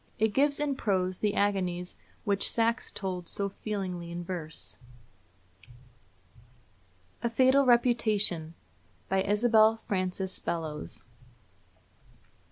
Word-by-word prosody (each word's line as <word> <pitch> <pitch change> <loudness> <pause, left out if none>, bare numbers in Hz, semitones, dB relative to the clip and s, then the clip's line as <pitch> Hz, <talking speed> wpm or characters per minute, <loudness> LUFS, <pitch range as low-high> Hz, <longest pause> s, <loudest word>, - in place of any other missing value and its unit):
It 220 -1 +1
gives 285 +3 +2
in 290 -2 -1
prose 185 -5 0
the 210 -1 0
agonies 180 -3 0 0.3
which 200 -2 +1
Saxe 230 +1 +1
told 185 -3 -4
so 200 0 -1
feelingly 190 -4 -4
in 175 +1 -5
verse: 155 - -5 2.4
A 235 - 0
FATAL 260 +3 +4
REPUTATION. 215 -9 +2 0.5
BY 190 0 +2
ISABEL 220 +2 +4
FRANCES 185 -1 -2
BELLOWS. 160 -3 -4
200 Hz, 95 wpm, -29 LUFS, 180-225 Hz, 2.4 s, FATAL